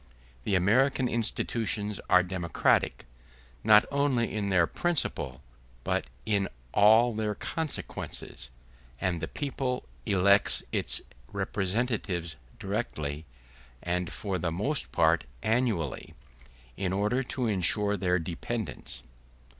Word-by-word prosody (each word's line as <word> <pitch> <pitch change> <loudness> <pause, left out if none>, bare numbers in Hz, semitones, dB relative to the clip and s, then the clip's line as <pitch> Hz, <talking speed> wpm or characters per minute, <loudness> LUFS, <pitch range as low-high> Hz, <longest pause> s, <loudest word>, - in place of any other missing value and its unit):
The 100 - +1
American 125 +8 +3
institutions 110 -2 -1
are 90 0 +6
democratic, 90 -2 +1 0.6
not 105 -1 +7
only 140 -5 +1
in 105 -2 -1
their 90 -3 +4
principle 85 - -1 0.4
but - - 0 0.2
in 100 -3 +1 0.3
all 110 +4 +6
their 105 -1 -1
consequences; 160 +7 -4 0.5
and 85 -3 -1
the - - -2
people 135 -3 -3 0.2
elects 100 0 +4
its - - +1 0.3
representatives 95 - -1 0.2
directly, 80 -8 -3 0.6
and 90 0 -1
for 95 -3 -3
the 80 0 -1
most 130 - -1
part 80 -1 +3 0.2
annually, 110 - 0 0.6
in 95 -2 -2
order 105 +6 +1
to 130 -1 -3
ensure 105 0 +2
their 90 -2 +1
dependence. 90 +7 -5
100 Hz, 105 wpm, -29 LUFS, 90-120 Hz, 0.6 s, not